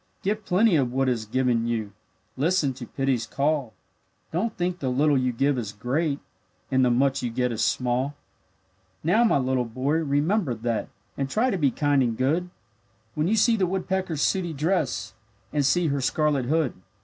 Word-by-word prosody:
Give 210 Hz, +2 st, -1 dB
plenty 195 Hz, +1 st, +3 dB
of 130 Hz, -4 st, +1 dB
what 135 Hz, +1 st, +1 dB
is 115 Hz, -3 st, -1 dB
given 120 Hz, -1 st, +1 dB
you, 110 Hz, -4 st, -2 dB, 0.4 s
Listen 150 Hz, 0 st, +1 dB
to 125 Hz, -2 st, -9 dB
pity's 135 Hz, -3 st, -1 dB
call; 140 Hz, -4 st, -1 dB, 0.6 s
Don't 205 Hz, +7 st, -2 dB
think 175 Hz, +1 st, -1 dB
the 130 Hz, -, -1 dB
little 145 Hz, +3 st, +3 dB
you 130 Hz, -1 st, +1 dB
give 135 Hz, +2 st, +1 dB
is 105 Hz, -3 st, -4 dB
great, 140 Hz, +7 st, -1 dB, 0.5 s
And 130 Hz, 0 st, +3 dB
the 125 Hz, -, +4 dB
much 135 Hz, +3 st, +2 dB
you 120 Hz, -, -2 dB
get 125 Hz, +1 st, -1 dB
is 115 Hz, -1 st, -1 dB
small. 130 Hz, +3 st, 0 dB, 0.9 s
Now, 210 Hz, +9 st, +4 dB
my 225 Hz, -, +4 dB
little 130 Hz, -1 st, +1 dB
boy, 130 Hz, +6 st, -1 dB
remember 155 Hz, -, +1 dB
that, 115 Hz, 0 st, -2 dB, 0.3 s
And 135 Hz, -1 st, -1 dB
try 240 Hz, -, +1 dB
to 195 Hz, -, 0 dB
be 145 Hz, -3 st, +4 dB
kind 145 Hz, +1 st, +1 dB
and 115 Hz, -3 st, 0 dB
good, 160 Hz, +8 st, 0 dB, 0.6 s
When 150 Hz, +4 st, 0 dB
you 215 Hz, -, +2 dB
see 230 Hz, +2 st, +4 dB
the 190 Hz, -4 st, +1 dB
woodpecker's 185 Hz, -4 st, -1 dB
sooty 180 Hz, -4 st, 0 dB
dress, 150 Hz, -, -1 dB, 0.4 s
And 145 Hz, -1 st, +2 dB
see 165 Hz, +4 st, +2 dB
her 140 Hz, -1 st, -1 dB
scarlet 145 Hz, 0 st, +1 dB
hood. 155 Hz, 0 st, +1 dB
140 Hz, 180 wpm, -25 LUFS, 125-170 Hz, 0.9 s, the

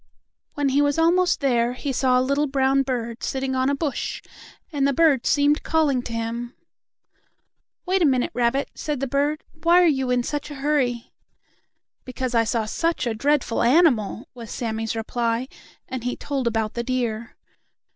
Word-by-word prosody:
When 285 Hz, -1 st, +1 dB
he 275 Hz, +2 st, +3 dB
was 285 Hz, 0 st, +1 dB
almost 350 Hz, +2 st, +3 dB
there 240 Hz, -3 st, +2 dB
he 275 Hz, +2 st, -4 dB
saw 255 Hz, 0 st, +2 dB
a 255 Hz, -, +1 dB
little 280 Hz, +2 st, +1 dB
brown 270 Hz, 0 st, +2 dB
bird 240 Hz, -3 st, -3 dB
sitting 265 Hz, 0 st, -2 dB
on 260 Hz, +1 st, +1 dB
a 280 Hz, -, +1 dB
bush, 285 Hz, -1 st, -3 dB, 0.5 s
and 280 Hz, -3 st, +1 dB
the 280 Hz, -, +1 dB
bird 290 Hz, -4 st, +3 dB
seemed 290 Hz, +1 st, +3 dB
calling 295 Hz, -6 st, +1 dB
to 240 Hz, -, -8 dB
him. 230 Hz, +2 st, -4 dB, 1.3 s
"Wait 375 Hz, +1 st, +1 dB
a -, -, +5 dB
minute, 260 Hz, -4 st, +2 dB
rabbit," 245 Hz, +3 st, 0 dB
said 295 Hz, -3 st, -4 dB
the 275 Hz, -, -1 dB
bird. 285 Hz, +3 st, 0 dB, 0.2 s
"Why 340 Hz, +2 st, +5 dB
are -, -, +5 dB
you 265 Hz, -5 st, +1 dB
in 250 Hz, -1 st, +2 dB
such 295 Hz, +3 st, -4 dB
a 295 Hz, -, -7 dB
hurry?" 270 Hz, -4 st, -1 dB, 0.9 s
"Because 255 Hz, 0 st, -4 dB
I 230 Hz, -1 st, +3 dB
saw 225 Hz, -1 st, 0 dB
such 330 Hz, +7 st, -1 dB
a 235 Hz, -, 0 dB
dreadful 275 Hz, +1 st, 0 dB
animal," 250 Hz, -, +3 dB
was 235 Hz, -3 st, -10 dB
Sammie's 225 Hz, -1 st, -3 dB
reply, 230 Hz, +2 st, -1 dB, 0.4 s
and 260 Hz, -2 st, -5 dB
he 250 Hz, 0 st, -2 dB
told 275 Hz, -4 st, -3 dB
about 220 Hz, -2 st, -1 dB
the 235 Hz, -, -2 dB
deer. 235 Hz, -3 st, -3 dB
260 Hz, 175 wpm, -23 LUFS, 235-290 Hz, 1.3 s, a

